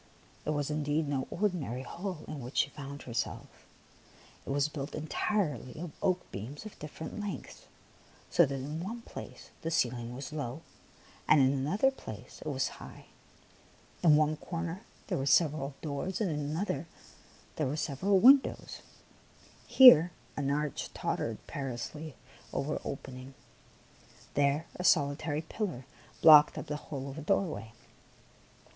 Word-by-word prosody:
It - - -2
was 145 -1 -1
indeed 150 +1 0
no 135 -2 -1
ordinary 170 - -1
hall 175 +5 -6
in 155 - -6
which 125 +3 -7
she 140 - +3
found 140 -1 -8
herself; 120 -2 -3 1.0
it - - -10
was 140 +1 +2
built 145 -1 -6
entirely 155 - -2
of 170 -1 -5
oak 185 -1 +2
beams 125 - -7
of 215 - -10
different 150 +4 -7
lengths, 205 -1 -6 0.6
so 170 - +5
that 140 - -3
in 150 +5 -4
one 230 +4 -6
place - - -10
the 165 - -2
ceiling 120 -5 0
was 135 +3 -7
low 140 0 -4 0.6
and 155 - +6
in 135 0 +5
another 180 - +2
place 265 - -10
it - - -7
was - - 0
high, - - -11 1.0
in 160 -4 +6
one 155 0 +3
corner 170 +3 -4 0.2
there - - -2
were 135 - -2
several 145 -3 +3
doors, 160 +5 -3
and 205 -6 0
in 150 - -2
another 155 +1 -2 0.7
there 150 - +1
were 140 - -2
several 180 +7 +1
windows; 265 +7 +5 0.9
here 210 - +9 0.3
an 140 -1 -1
arch 150 0 -2
tottered - - -3
perilously 140 +3 -5 0.4
over 150 +2 -2
an - - -8
open 135 -2 -6
ing, 130 - -9
and 135 - -14 1.0
there 145 +2 +2
a 180 - -4
solitary 150 -1 +2
pillar 165 - -4 0.4
blocked 150 -2 +9
up - - -4
the 150 -1 -3
whole 140 -2 -4
of 140 +3 -6
a - - -6
doorway. 155 - -1
150 Hz, 150 wpm, -31 LUFS, 140-170 Hz, 1.0 s, here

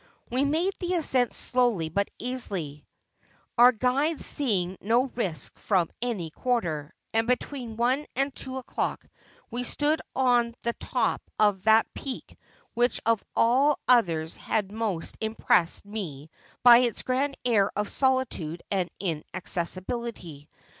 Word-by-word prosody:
' - - -38
We 260 +3 +2
made 330 +7 +1
the 360 0 -1
ascent 260 -7 +2
slowly 240 -10 +1
but 200 +5 0
easily, 190 - -4 0.7
our 245 +1 +8
guides 265 +7 +1
seeing 190 -10 0
no 230 +5 +3
risk 185 - -3
from 185 -5 +1
any 210 -10 -2
quarter; 170 - -2 0.2
and 225 +1 +2
between 250 -2 -2
one 255 +5 +1
and 275 +2 0
two 265 -1 -6
o'clock 260 - -3 0.5
we 245 +1 -2
stood 295 +5 0
on 245 -3 +2
the 235 - 0
top 245 -1 -1 0.2
of 205 -3 +2
that 220 0 +6
peak 270 -3 -7 0.4
which 240 +1 +1
of 230 -2 +2
all 265 +5 +4
others 170 -10 +3
had 205 -3 -2
most 210 -6 -3
impressed 220 -5 +1
me 165 -8 -6 0.3
by 240 -1 +9
its 245 -2 0
grand 270 +2 0
air 215 -5 +3
of 210 0 -1
solitude 260 - 0
and 185 -3 0
inaccessibility. 180 0 -3
230 Hz, 135 wpm, -27 LUFS, 185-255 Hz, 0.7 s, by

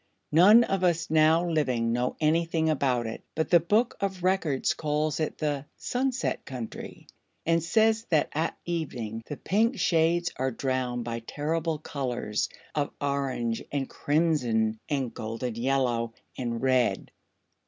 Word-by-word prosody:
"None 200 +9 +8
of 195 -4 -1
us 170 -3 +1
now 160 +2 +4
living 130 -8 +1
know 125 +1 0
anything 160 0 +2
about 130 -5 +1
it, 115 - -5
but 160 +2 -1
the 175 - +8
Book 210 +9 +1
of 190 -2 -2
Records 180 -8 +1
calls 150 0 -1
it 155 - -2
the 145 -2 -2
'Sunset 260 +1 -1
Country,' 125 -4 -7 0.4
and 165 0 +3
says 220 +6 +2
that 160 -4 +2
at 160 +2 -1
evening 125 -10 -3
the 145 - -5
pink 225 +6 +1
shades 170 +1 +2
are 130 +1 0
drowned 130 -1 -2
by 115 0 -3
terrible 155 +6 -2
colors 130 -8 -2 0.2
of 145 -1 0
orange 135 -5 -1
and 140 -2 -1
crimson 125 -9 +1
and 135 -5 -1
golden 115 +2 -4
yellow 120 -2 0 0.2
and 120 -1 -3
red. 130 -2 +1
150 Hz, 140 wpm, -27 LUFS, 125-165 Hz, 0.4 s, None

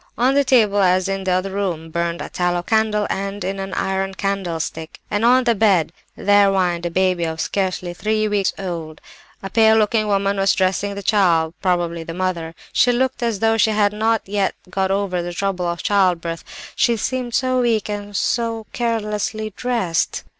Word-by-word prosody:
"On 255 +3 +3
the 280 0 +4
table, 220 -6 +3
as 185 -1 +3
in 195 0 -3
the 185 - +1
other 185 +2 -1
room, 175 -5 -3
burned 170 +1 -2
a - - -7
tallow 175 -1 -1
candle 220 0 +1
end 195 0 -3
in 195 +1 -3
an 195 0 -5
iron 195 0 -1
candlestick; 170 -5 -3
and 205 +2 0
on 250 +2 +5
the 240 -1 +3
bed 195 -7 +2 0.2
there 205 0 +4
whined 175 -3 0
a - - -3
baby 185 0 +1
of 160 -1 -3
scarcely 185 -1 -2
three 215 +3 0
weeks 205 -2 +1
old. 165 -5 -5 0.4
A 195 - -4
pale 220 -1 +5
looking 215 0 +2
woman 200 0 +1
was 195 0 +2
dressing 195 +1 0
the 200 - -6
child, 170 -6 +2
probably 175 -3 0
the 165 0 -7
mother; 175 -3 -3 0.2
she 245 - +4
looked 260 +1 0
as 230 -4 -1
though 225 0 +3
she 220 - +3
had 210 -1 +2
not 220 +1 +1
as - - -19
yet 200 -2 +1 0.2
got 190 0 0
over 195 -2 0
the 175 0 -5
trouble 185 -1 -2
of 170 -1 -3
childbirth, 175 -4 +1 0.3
she 235 -2 +2
seemed 250 +1 -2
so 255 -1 +1
weak 225 -4 +1
and 205 -1 -4
was 205 -1 -5
so 230 -2 -1
carelessly 215 -2 -2
dressed. 230 -10 -1
195 Hz, 190 wpm, -20 LUFS, 180-220 Hz, 0.4 s, on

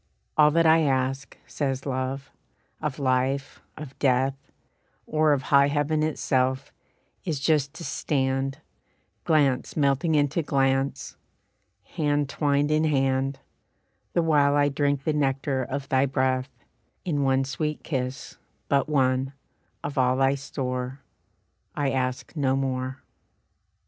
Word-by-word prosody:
"All 150 -1 +6
that 165 +2 +2
I 160 0 +6
ask," 135 -1 -1
says 135 -2 -3
Love, 135 0 -3 0.5
"of 150 -3 -3
life, 135 0 0 0.2
of 150 -3 -9
death, 130 0 +2 0.7
Or 155 0 +2
of 140 -2 +1
high 140 0 +7
heaven 145 +2 0
itself, 130 -3 0 0.5
is 160 -7 -2
just 145 0 +1
to 170 - -8
stand, 135 -3 -1 0.7
Glance 145 -5 +2
melting 145 +3 +2
into 145 +2 +2
glance, 135 -2 0 0.7
hand 145 -2 -1
twined 145 0 +1
in 155 +1 +2
hand, 135 -2 0 0.7
The 170 - +2
while 145 -3 +3
I 145 0 +3
drink 140 -1 0
the 155 - 0
nectar 135 -2 0
of 135 +2 -4
thy 135 +1 +3
breath, 130 0 0 0.6
In 150 -5 0
one 135 -1 +2
sweet 150 +3 -3
kiss, 130 -1 -4 0.3
but 140 +1 +2
one, 135 -1 +1 0.5
of 145 -1 -3
all 130 0 +3
thy 135 0 +3
store, 130 -1 -4 0.7
I 140 -2 0
ask 130 +3 -2
no 135 -3 +1
more." 130 -1 -3
135 Hz, 125 wpm, -26 LUFS, 130-145 Hz, 0.7 s, high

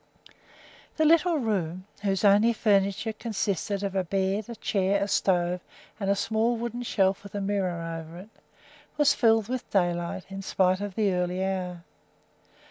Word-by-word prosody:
The 315 - +3
little 335 +1 +4
room, 185 - -2 0.2
whose 195 -1 0
only 205 +4 +5
furniture 200 0 +1
consisted 205 -3 -2
of 200 -1 -2
a 190 -1 +1
bed, 195 +4 -1
a 235 - -6
chair, 200 -2 0
a - - -2
stove, 180 -2 +1 0.4
and 195 -2 -1
a 200 - +3
small 220 +3 0
wooden 235 +1 -4
shelf 195 -5 +1
with 200 0 -11
a - - -1
mirror 180 -5 -2
over 165 +1 -11
it, 190 +4 -11 0.7
was 295 -1 +5
filled 225 -3 +3
with 255 0 -4
daylight 175 -1 0
in 195 0 -5
spite 185 0 +1
of 205 -2 -5
the 205 -3 +2
early 180 +1 -1
hour. 180 -2 -3
195 Hz, 160 wpm, -27 LUFS, 185-220 Hz, 0.7 s, only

